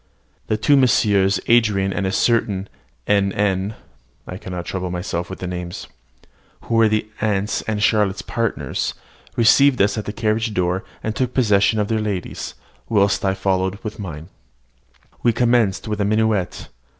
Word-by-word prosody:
The 110 Hz, -, 0 dB
two 140 Hz, +7 st, +3 dB
Messrs. 100 Hz, -7 st, +3 dB
Andran 105 Hz, -5 st, +3 dB
and 95 Hz, -, -1 dB
a -, -, -1 dB
certain 105 Hz, -3 st, +1 dB, 0.4 s
N. 100 Hz, -1 st, +2 dB
N. 100 Hz, 0 st, 0 dB, 0.5 s
(I 90 Hz, -, -7 dB
cannot 90 Hz, -3 st, -6 dB
trouble 90 Hz, -1 st, -3 dB
myself 90 Hz, -1 st, -3 dB
with 95 Hz, -, -6 dB
the -, -, -6 dB
names), 90 Hz, -1 st, -5 dB, 0.8 s
who -, -, -5 dB
were 115 Hz, -1 st, +5 dB
the 110 Hz, 0 st, 0 dB
aunt's 105 Hz, -1 st, 0 dB
and 105 Hz, -1 st, -1 dB
Charlotte's 105 Hz, -3 st, +2 dB
partners, 110 Hz, -, -2 dB, 0.4 s
received 130 Hz, +4 st, +5 dB
us 100 Hz, +2 st, +2 dB
at 105 Hz, -, -5 dB
the -, -, -3 dB
carriage 110 Hz, 0 st, -1 dB
door, 90 Hz, +2 st, 0 dB, 0.2 s
and 110 Hz, 0 st, -2 dB
took 125 Hz, -1 st, -1 dB
possession 105 Hz, -3 st, +3 dB
of 105 Hz, -, 0 dB
their 110 Hz, 0 st, 0 dB
ladies, 100 Hz, -4 st, -4 dB, 0.3 s
whilst 100 Hz, -2 st, +2 dB
I 95 Hz, -1 st, +1 dB
followed 95 Hz, 0 st, 0 dB
with 110 Hz, -1 st, -6 dB
mine. 80 Hz, -4 st, -7 dB, 0.9 s
We 120 Hz, -, +3 dB
commenced 120 Hz, -4 st, +2 dB
with 105 Hz, -1 st, -2 dB
a -, -, +2 dB
minuet. 110 Hz, -3 st, 0 dB
105 Hz, 160 wpm, -21 LUFS, 95-110 Hz, 0.9 s, were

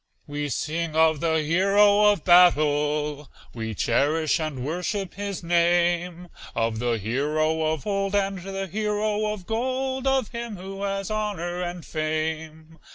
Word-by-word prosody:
We 145 Hz, 0 st, -4 dB
sing 160 Hz, +4 st, -2 dB
of 160 Hz, -1 st, +4 dB
the 160 Hz, -1 st, +1 dB
hero 200 Hz, +5 st, +4 dB
of 200 Hz, -6 st, -2 dB
battle, 150 Hz, -4 st, +3 dB, 0.2 s
We 110 Hz, -2 st, -5 dB
cherish 155 Hz, -, +1 dB
and 150 Hz, -5 st, -4 dB
worship 180 Hz, +4 st, -3 dB
his 200 Hz, -2 st, -5 dB
name; 175 Hz, +1 st, +1 dB, 0.3 s
Of 115 Hz, -1 st, 0 dB
the 120 Hz, -1 st, 0 dB
hero 150 Hz, +9 st, 0 dB
of 155 Hz, -3 st, -4 dB
old, 195 Hz, -1 st, -1 dB
and 195 Hz, -1 st, 0 dB
the 195 Hz, +1 st, -5 dB
hero 210 Hz, +2 st, -1 dB
of 205 Hz, -4 st, -7 dB
gold, 260 Hz, +4 st, -2 dB
Of 265 Hz, -5 st, +1 dB
him 235 Hz, -3 st, -6 dB
who 195 Hz, +2 st, -8 dB
has 195 Hz, 0 st, -2 dB
honor 185 Hz, -5 st, -2 dB
and 175 Hz, -1 st, -5 dB
fame. 155 Hz, 0 st, -4 dB
175 Hz, 140 wpm, -25 LUFS, 155-200 Hz, 0.3 s, of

